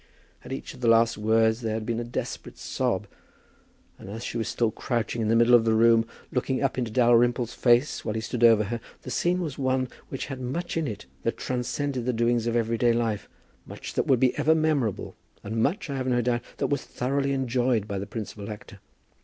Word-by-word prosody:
At 125 - -10
each 135 - -5
of - - -14
the 120 - +1
last 115 0 +5
words 110 +2 +2
there 110 -2 -1
had 110 -1 -3
been 115 +1 -1
a - - -2
desperate 120 - -5
sob; - - -1 0.9
and - - -10
as 110 +3 -6
she - - -5
was 115 - -2
still 115 -2 0
crouching 120 -1 -2
in 110 - 0
the 115 - +3
middle 120 +1 +5
of 120 -2 +7
the 110 -1 +2
room, 115 0 +5 0.2
looking 130 +1 0
up 135 - +1
into 120 -2 -1
Dalrymple's 120 0 +3
face 120 +3 +2
while 110 - -3
he - - 0
stood 120 +1 -3
over 115 -2 +7
her, 115 +3 -3 0.2
the - - -6
scene 180 +1 +1
was 150 -6 -4
one 130 -1 +1 0.2
which 135 - -4
had 130 -2 -6
much 165 +8 -3
in 165 -2 0
it 105 - -6 0.2
that - - -1
transcended 130 +1 -2
the 125 - +2
doings 120 0 +1
of 115 - 0
everyday 115 +1 +2
life, 115 -3 -1 0.4
much - - -8
that - - 0
would 130 -3 +4
be 130 0 +3
ever 160 +1 +4
memorable, 150 - 0 0.3
and 110 +2 -2
much, 165 - 0
I 140 -2 -3
have 130 -1 -2
no 120 -1 +2
doubt, 120 0 +1 0.2
that - - 0
was 145 -2 -1
thoroughly 140 +2 -1
enjoyed 125 -4 +1
by 100 -2 -3
the 100 - -5
principal 105 -1 -6
actor. 105 -1 -9
120 Hz, 220 wpm, -26 LUFS, 115-130 Hz, 0.9 s, of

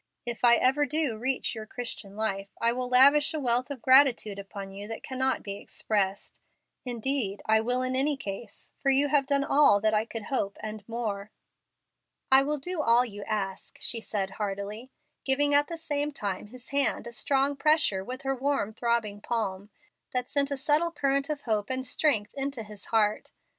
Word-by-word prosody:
If 240 0 -4
I 235 -1 +7
ever 270 +5 +2
do 305 -6 +1
reach 260 +2 -1
your 220 -2 -7
Christian 225 -5 -6
life, 200 -2 -2
I 235 0 +2
will 250 0 -3
lavish 285 +5 +5
a - - -1
wealth 250 -1 0
of 270 -5 -7
gratitude 255 -6 +4
upon 195 0 -8
you 200 +1 -8
that 225 - -6
cannot 260 0 -1
be 200 -2 -5
expressed. 200 -2 -2 0.4
Indeed, 240 -4 -1
I 220 0 +4
will 250 +3 0
in 255 0 -1
any 280 +2 +2
case, 210 -3 -7
for 275 - +1
you 275 +2 +4
have 275 -1 +2
done 280 0 +2
all 280 -8 +5
that 215 0 +2
I 215 +1 +2
could 225 -1 -6
hope 200 -7 -2
and 215 -1 -6
more." 215 -3 -4 1.0
"I 265 0 +8
will 295 +2 -1
do 345 +3 -3
all 240 -2 +4
you 205 -3 -8
ask," 195 -3 -4
she 230 -2 -1
said, 195 -3 -3
heartily, 205 +4 -5 0.3
giving 285 +2 +2
at 290 0 +4
the 335 - -6
same 295 -2 -2
time 205 -7 -4
his 250 +3 -12
hand 280 -3 +1
a 235 - -7
strong 275 +4 +1
pressure 300 -10 +2
with 255 +6 -7
her 270 0 0
warm, 265 -5 -1
throbbing 225 -3 -1
palm, 205 -4 -2 0.5
that 250 0 0
sent 280 -1 +2
a 280 - -3
subtle 305 +5 +2
current 275 -2 0
of 295 -2 -3
hope 215 -5 -1
and 260 0 -1
strength 245 -6 +1
into 275 -4 -3
his 210 -1 -9
heart. 215 -2 +1
245 Hz, 190 wpm, -28 LUFS, 210-275 Hz, 1.0 s, I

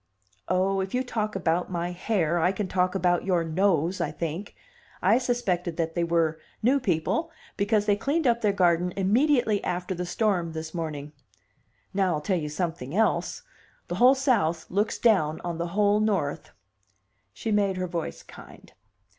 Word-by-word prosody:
"Oh, 190 +1 +1
if 190 +4 -3
you 255 - +1
talk 215 -4 -3
about 175 -1 0
my 175 -1 -2
hair, 175 -3 0
I 180 +3 +3
can 195 0 -3
talk 185 0 0
about 180 -2 +2
your 180 -3 +1
nose, 170 +1 +1
I - - 0
think. 170 +5 -5 0.4
I - - +4
suspected 185 -9 -1
that 165 -1 -1
they 170 - 0
were: 165 -1 +1 0.2
'new 265 +5 +4
people' 230 - 0 0.3
because 205 +1 +1
they 205 - +3
cleaned 285 +9 -1
up 235 -1 +3
their 210 - +3
garden 180 -2 +2
immediately 220 +2 +2
after 180 +1 -2
the 180 0 -4
storm 180 -5 0
this 160 0 -6
morning. 150 -4 -4 0.8
Now, 190 -3 +1
I'll 150 - -3
tell 180 +3 0
you 150 -1 -4
something 160 -3 -4
else: 220 - +1 0.5
the - - -2
whole 255 +2 +7
South 210 - +1
looks 205 +3 0
down 180 -10 +2
on 170 -1 -4
the 170 - -1
whole 205 0 +4
North." 200 -9 -1 0.8
She 225 - -4
made 200 -2 +2
her 185 - -1
voice 170 -2 -5
kind. - - -14
185 Hz, 170 wpm, -26 LUFS, 170-210 Hz, 0.8 s, whole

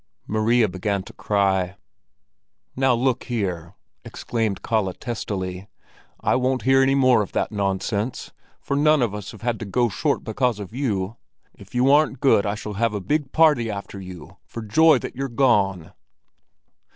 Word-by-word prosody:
Maria 110 +2 +2
began 95 +1 -2
to - - -13
cry. 95 -2 0 1.0
"Now 130 -1 +3
look 125 +1 0
here!" 90 -8 -3 0.3
exclaimed 110 -5 -3
Kalle 110 -5 0
testily. 95 -5 -5 0.5
"I - - +1
won't 130 0 0
hear 135 +1 +4
any 135 +1 +3
more 130 -4 +4
of 100 - -5
that - - -1
nonsense, 100 +3 -2 0.3
for 140 - -3
none 150 -1 +4
of 110 -4 -1
us 105 -1 -6
have 110 -1 -13
had 120 -2 -1
to 115 - -5
go 120 +4 +1
short - - -1
because 125 0 0
of 100 +1 -8
you. 110 -5 -2 0.4
If - - -15
you 125 +2 +4
aren't 145 -3 +3
good, 130 -7 +3
I 100 - -1
shall 105 0 -6
give 110 +1 0
a - - -1
big 140 - -1
party 150 -8 +4
after 100 -1 -6
you, 90 -2 -11
for 115 - -7
joy 155 +8 +5
that - - -7
you're 135 +1 -3
gone!" 100 - +1
110 Hz, 165 wpm, -23 LUFS, 100-130 Hz, 1.0 s, joy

